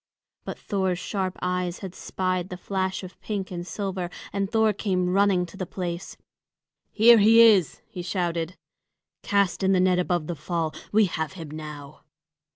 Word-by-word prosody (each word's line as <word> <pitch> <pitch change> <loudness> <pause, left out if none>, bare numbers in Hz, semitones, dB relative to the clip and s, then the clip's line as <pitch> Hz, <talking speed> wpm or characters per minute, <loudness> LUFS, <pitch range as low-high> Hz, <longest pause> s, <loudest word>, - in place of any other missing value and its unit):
But - - -5
Thor's 190 -3 -1
sharp 190 0 -3
eyes 180 -1 -1
had 190 -3 -6
spied 185 -1 -2
the 180 - -6
flash 190 0 -2
of 185 0 -11
pink 200 -3 -4
and 175 0 -5
silver, 190 -4 -3 0.2
and 195 -1 -1
Thor 220 -1 +3
came 185 -3 0
running 195 -2 +3
to 175 +3 -13
the 185 -3 -4
place. 175 0 -5 0.7
"He 225 +2 +6
is 235 - +8
here!" 220 -4 +6
he 180 - -7
shouted. 175 -1 -2 0.6
"Cast 200 -4 +1
in 190 0 +3
the 185 - +3
net 180 0 +3
above 175 -3 0
the 175 - -3
fall! 160 0 -2 0.2
We 215 0 +5
have 160 -2 -3
him 165 -5 -8
now!" 150 -2 -9
185 Hz, 165 wpm, -25 LUFS, 175-195 Hz, 0.7 s, is